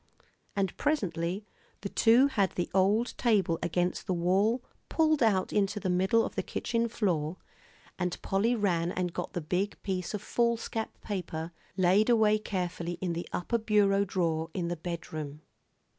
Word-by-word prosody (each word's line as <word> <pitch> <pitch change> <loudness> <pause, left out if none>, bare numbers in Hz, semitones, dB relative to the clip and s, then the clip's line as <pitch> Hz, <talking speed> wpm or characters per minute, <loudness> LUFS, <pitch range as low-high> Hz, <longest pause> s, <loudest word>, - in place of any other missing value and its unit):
And 195 -2 0
presently 190 - -1 0.4
the 200 - -4
two 235 +6 +5
had 200 -8 +1
the 175 - -2
old 205 +6 +3
table 200 -9 +2
against 175 +1 -1
the 185 - +1
wall 195 +8 +2 0.3
pulled 310 -2 +2
out 200 -5 +2
into 205 +1 +1
the 185 -2 -1
middle 190 +5 +3
of - - -5
the - - -1
kitchen 230 0 -1
floor, 180 -7 -1 0.6
and 180 -1 -1
Polly 215 +5 +2
ran 175 -6 +1
and 180 -2 -2
got - - -4
the 175 - -2
big 180 +6 -1
piece 190 0 -2
of 205 - -5
foolscap 235 -1 -1
paper 170 -5 -4 0.3
laid 190 +5 +4
away 215 -2 +4
carefully 180 -4 -3
in 175 -1 -3
the 170 +1 -5
upper 235 +7 -1
bureau 205 -2 +3
drawer 165 -4 -1
in 170 -2 -1
the 175 - -1
bedroom. 155 -3 -6
190 Hz, 160 wpm, -30 LUFS, 175-215 Hz, 0.6 s, two